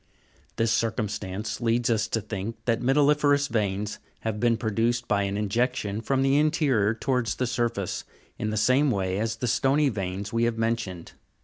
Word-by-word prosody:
This 115 Hz, 0 st, +1 dB
circumstance 105 Hz, -2 st, -2 dB
leads 120 Hz, 0 st, +1 dB
us 110 Hz, -2 st, +1 dB
to 115 Hz, -, -1 dB
think 105 Hz, +1 st, -5 dB
that 115 Hz, -1 st, +1 dB
metalli'ferous 145 Hz, +1 st, +3 dB
veins 105 Hz, -3 st, -2 dB, 0.2 s
have 110 Hz, -1 st, -3 dB
been 120 Hz, 0 st, +2 dB
produced 115 Hz, +2 st, 0 dB
by 100 Hz, -1 st, +2 dB
an 100 Hz, 0 st, -1 dB
injection 105 Hz, 0 st, -1 dB
from 135 Hz, +3 st, +1 dB
the 135 Hz, +1 st, +3 dB
interior 140 Hz, -9 st, +2 dB
towards 125 Hz, -3 st, 0 dB
the 130 Hz, -, -1 dB
surface, 115 Hz, -5 st, -2 dB, 0.4 s
in 110 Hz, -, -1 dB
the 110 Hz, -, -2 dB
same 130 Hz, +7 st, +3 dB
way 95 Hz, -4 st, -1 dB
as 110 Hz, +1 st, -1 dB
the 125 Hz, +2 st, -3 dB
stony 140 Hz, +5 st, +3 dB
veins 100 Hz, -1 st, -4 dB
we 115 Hz, 0 st, +2 dB
have 120 Hz, -1 st, -1 dB
mentioned. 115 Hz, -7 st, -2 dB
115 Hz, 170 wpm, -26 LUFS, 105-125 Hz, 0.4 s, metalli'ferous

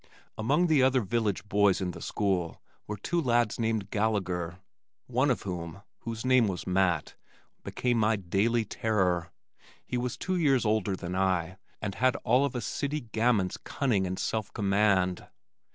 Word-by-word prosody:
Among 145 Hz, +11 st, +2 dB
the 155 Hz, -5 st, +4 dB
other 130 Hz, 0 st, +4 dB
village 110 Hz, -2 st, -1 dB
boys 100 Hz, -1 st, +3 dB
in 90 Hz, -2 st, -2 dB
the -, -, -10 dB
school 95 Hz, -5 st, -1 dB, 0.3 s
were 105 Hz, -, -4 dB
two 170 Hz, -, -1 dB
lads 120 Hz, -5 st, +1 dB
named 110 Hz, -3 st, -1 dB
Gallagher, 95 Hz, -5 st, -1 dB, 0.5 s
one 130 Hz, +3 st, +1 dB
of 125 Hz, -, 0 dB
whom, 90 Hz, 0 st, -6 dB, 0.2 s
whose 115 Hz, +1 st, -6 dB
name 130 Hz, -3 st, +4 dB
was 95 Hz, -2 st, -4 dB
Matt, 90 Hz, -4 st, +1 dB, 0.5 s
became 120 Hz, -2 st, 0 dB
my 110 Hz, +1 st, +3 dB
daily 105 Hz, +5 st, +1 dB
terror. 95 Hz, -6 st, 0 dB, 0.6 s
He 125 Hz, -, -3 dB
was 125 Hz, 0 st, -3 dB
two 185 Hz, -1 st, -1 dB
years 135 Hz, -8 st, +3 dB
older 105 Hz, -2 st, +1 dB
than 90 Hz, -1 st, -5 dB
I 95 Hz, -1 st, 0 dB, 0.3 s
and 100 Hz, -2 st, -2 dB
had 130 Hz, +4 st, +2 dB
all 125 Hz, +4 st, +3 dB
of 140 Hz, -, -4 dB
a 120 Hz, -, -2 dB
city 145 Hz, +6 st, -2 dB
gamin's 110 Hz, -5 st, +1 dB
cunning 110 Hz, -9 st, -1 dB
and 95 Hz, +1 st, -3 dB
self 110 Hz, -2 st, -2 dB
command. 100 Hz, -3 st, +2 dB
105 Hz, 160 wpm, -29 LUFS, 95-120 Hz, 0.6 s, the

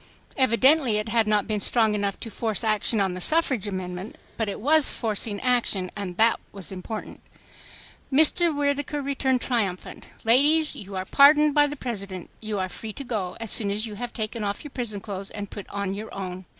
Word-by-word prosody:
Evidently 260 Hz, -1 st, +4 dB
it 210 Hz, +1 st, -3 dB
had 225 Hz, -1 st, +2 dB
not 210 Hz, -1 st, +2 dB
been 215 Hz, -2 st, -2 dB
strong 220 Hz, 0 st, +3 dB
enough 200 Hz, -1 st, -2 dB
to 225 Hz, -, -7 dB
force 220 Hz, -2 st, -1 dB
action 215 Hz, 0 st, +2 dB
on 190 Hz, -2 st, +1 dB
the 180 Hz, -, -6 dB
suffrage 270 Hz, -, +1 dB
amendment, 185 Hz, 0 st, -5 dB, 0.2 s
but 225 Hz, -2 st, -2 dB
it -, -, -5 dB
was 300 Hz, +5 st, +4 dB
forcing 215 Hz, -2 st, -2 dB
action, 235 Hz, -7 st, +1 dB
and 190 Hz, -4 st, -5 dB
that 225 Hz, +1 st, +4 dB
was 195 Hz, -3 st, -5 dB
important. 195 Hz, +4 st, -7 dB, 0.9 s
Mr. 315 Hz, +5 st, +5 dB
Whittaker 290 Hz, 0 st, -1 dB
returned 265 Hz, -2 st, 0 dB
triumphant. 205 Hz, -8 st, -2 dB, 0.2 s
"Ladies, 295 Hz, +7 st, +4 dB
you 200 Hz, -1 st, -8 dB
are 185 Hz, 0 st, -3 dB
pardoned 295 Hz, +5 st, +6 dB
by 295 Hz, 0 st, +5 dB
the 290 Hz, -, -5 dB
President. 200 Hz, -9 st, -6 dB
You 215 Hz, -1 st, -3 dB
are 185 Hz, -1 st, -1 dB
free 215 Hz, +3 st, -8 dB
to 280 Hz, -, -7 dB
go 210 Hz, -8 st, -3 dB
as 225 Hz, -2 st, -2 dB
soon 205 Hz, -3 st, +3 dB
as 210 Hz, +3 st, -1 dB
you 220 Hz, -, -7 dB
have 240 Hz, +3 st, -5 dB
taken 220 Hz, 0 st, -4 dB
off 200 Hz, 0 st, -3 dB
your 295 Hz, -, -9 dB
prison 220 Hz, -6 st, -4 dB
clothes 195 Hz, -2 st, -4 dB
and 205 Hz, -1 st, -6 dB
put 205 Hz, -, -8 dB
on 200 Hz, -1 st, -3 dB
your 215 Hz, +2 st, -7 dB
own." 185 Hz, -1 st, -6 dB
220 Hz, 195 wpm, -25 LUFS, 200-260 Hz, 0.9 s, pardoned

